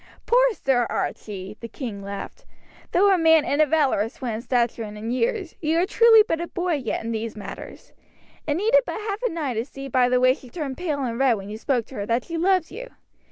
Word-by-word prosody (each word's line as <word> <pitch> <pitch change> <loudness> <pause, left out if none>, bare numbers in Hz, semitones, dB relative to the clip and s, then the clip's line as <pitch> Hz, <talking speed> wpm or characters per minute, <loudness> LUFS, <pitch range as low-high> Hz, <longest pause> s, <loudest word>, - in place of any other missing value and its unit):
"Poor - - +4
Sir 255 - +1
Archie!" 200 0 -4
the 230 - -7
king 225 -5 -6
laughed. 200 - -7 0.5
"Though 395 +2 +4
a 370 - +2
man, 320 -1 +5
and 285 +2 +1
a 305 - +4
valorous 270 -8 +1
one 245 -4 -3
in 220 - -4
stature 240 -2 0
and 210 -1 -6
in 220 +2 -4
years, 390 - -1
you 320 0 +1
are 350 - +3
truly 450 +2 +6
but 325 0 -1
a 345 - -3
boy 355 0 -2
yet 265 -7 -2
in 230 - -3
these 225 0 -4
matters. 210 - -9 0.6
It 290 - +1
needed 450 +8 +4
but 485 - -5
half 420 0 -4
an 340 - -6
eye 285 -6 -1
to 225 0 -1
see 275 +1 -9
by 250 -1 +3
the 250 0 +3
way 255 0 +5
she 260 -2 -13
turned 280 -3 -5
pale 300 -6 -2
and 235 -1 -3
red 265 -3 +4
when 195 0 -8
you 215 - -5
spoke 245 -3 0
to 265 - -13
her 200 0 -4
that 235 +1 0
she 335 - -6
loves 370 -1 +2
you. - - -8
275 Hz, 240 wpm, -24 LUFS, 230-355 Hz, 0.6 s, truly